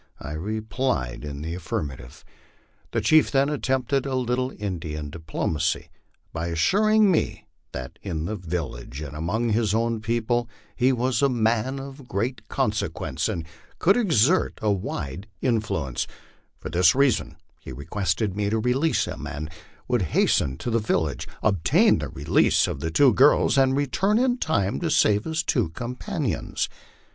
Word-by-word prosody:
I 75 - -7
replied 105 - -2
in 75 0 -6
the 80 +1 -4
affirmative. 70 -7 -5 0.6
The - - -1
chief 155 0 +5
then 140 +1 +2
at 150 - -3
tempted 130 +1 0
a 135 - -1
little 125 +1 0
Indian 80 -7 -4
diplomacy, 80 -1 -2 0.4
by 80 +1 -3
assuring 205 - +3
me 165 - -1 0.3
that 65 0 -7
in 80 -1 -3
the 110 - -2
village 80 - -5
and 75 -1 -7
among 105 +10 -1
his 110 -1 +1
own 115 -1 0
people 115 +1 0 0.3
he 125 +2 +3
was 125 +1 0
a 140 - +4
man 120 +2 +1
of 135 -1 -9
great 120 +5 -3
consequence, 75 - -1
and 85 -7 -3 0.3
could 195 +4 +4
exert 175 - +3
a 105 -1 +1
wide 95 -2 -4
influence; 100 - -1 0.5
for - - -7
this 85 0 +4
reason 135 -5 +2 0.2
he - - -10
requested 90 - -2
me 105 0 0
to 110 - +1
release 125 +8 +1
him, - - -6
and 75 +2 -5
he - - -15 0.3
would 125 -3 +1 0.2
hasten 65 -1 +2
to 120 - -4
the 115 - +2
village, 80 -8 -1 0.2
obtain 100 -7 +3
the - - -4
release 70 +2 +2
of - - -4
the 80 - -2
two 125 - +5
girls, 140 +7 +5
and 135 0 +3
return 190 - +1
in 250 0 +2
time 100 - 0
to 170 - -1
save 105 -8 +3
his 160 +1 -1
two 120 - +1
companions. 120 +9 -3
110 Hz, 155 wpm, -25 LUFS, 80-130 Hz, 0.6 s, chief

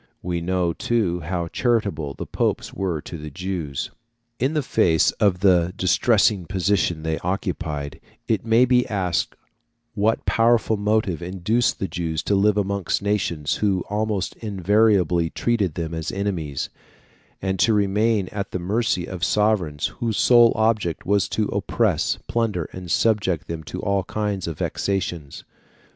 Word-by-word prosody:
We 85 -1 -2
know, 90 -1 0
too, 100 -7 0
how 85 +1 -3
charitable 100 - 0
the - - -6
popes - - -1
were 90 -6 -2
to 85 - -8
the 75 0 -7
Jews. 85 -3 -4 0.5
In 135 +6 0
the 150 - +1
face 80 -9 +3
of 95 -4 +2
the 90 -3 +4
distressing 100 -1 +2
position 90 -4 0
they 80 0 -1
occupied, 80 -6 -3 0.3
it 110 -4 0
may 115 +2 +4
be 125 0 +3
asked 95 -5 -1 0.6
what 110 0 0
powerful 115 -1 +3
motive 105 -4 0
induced 95 +7 0
the 95 - -2
Jews 80 -2 -3
to - - 0
live 100 +1 +3
amongst 100 -1 -1
nations 85 -7 0
who 95 -4 +1
almost 105 -2 -1
invariably 100 -4 +2
treated 105 -8 0
them 85 -1 -3
as 80 -1 -3
enemies, 90 -8 -3 0.7
and 95 -1 -2
to 115 - +4
remain 105 0 +2
at 100 -2 -4
the - - -3
mercy 95 0 0
of 90 -3 -7
sovereigns 95 -9 +1
whose 115 -3 -1
sole 120 -2 +6
object 110 -6 0
was 100 +1 +2
to 110 - 0
oppress, - - 0
plunder, 105 -9 -1
and 90 -1 -8
subject 100 -3 +1
them 85 -1 -5
to 75 - -6
all 100 -2 0
kinds 105 -4 -2
of 80 -3 -4
vexations? 85 -7 -3
95 Hz, 150 wpm, -23 LUFS, 85-105 Hz, 0.7 s, sole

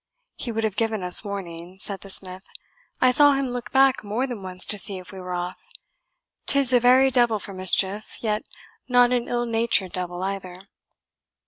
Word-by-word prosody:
"He 240 - -5
would 225 0 -3
have 215 -3 -1
given 220 -3 -1
us 180 0 +1
warning," 180 -3 -7
said 195 -2 -4
the 195 - -11
smith. 185 -1 -1 0.6
"I 255 - +4
saw 290 +2 +6
him 275 -1 -1
look 245 -1 -6
back 270 -2 +3
more 215 +5 -2
than 245 -6 -6
once 185 -1 -4
to 210 - 0
see 195 0 +2
if 185 -1 -11
we 190 - -10
were 180 -1 -5
off 175 +1 -5 0.8
'tis 275 -2 +4
a 245 - +6
very 255 +2 +5
devil 240 -3 +4
for 200 -1 -9
mischief, 190 +2 -1
yet 215 -2 -1 0.5
not 245 0 +5
an 245 -1 0
ill 240 0 -1
natured 225 -5 +1
devil 180 0 -4
either. 190 -2 -5
210 Hz, 190 wpm, -23 LUFS, 185-245 Hz, 0.8 s, saw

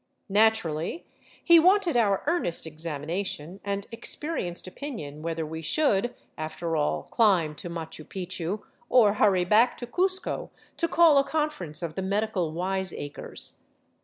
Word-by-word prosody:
Naturally 205 - +2 0.4
he 340 -1 +8
wanted 365 -1 +4
our 205 -5 +2
ear 345 +2 +3
nest 170 - 0
examination 160 +3 -4
and 200 0 -2
experienced 230 - -3
opinion 185 - -7
whether 165 0 -2
we 160 +1 -6
should, 240 - +1 0.2
after 160 +1 -3
all, 150 -1 0
climb 185 -9 +3
to 175 - -6
Machu 160 -2 -6
Picchu 185 +2 -4 0.3
or 225 -5 +6
hurry 195 -4 +3
back 220 +6 +4
to 245 - -5
Cuzco 370 +9 -1 0.3
to 335 - +1
call 330 -4 +6
a - - +3
conference 275 - -2
of 165 -2 -3
the 190 - -3
medical 195 -3 -1
wiseacres. 185 -3 -4
190 Hz, 135 wpm, -27 LUFS, 165-240 Hz, 0.4 s, he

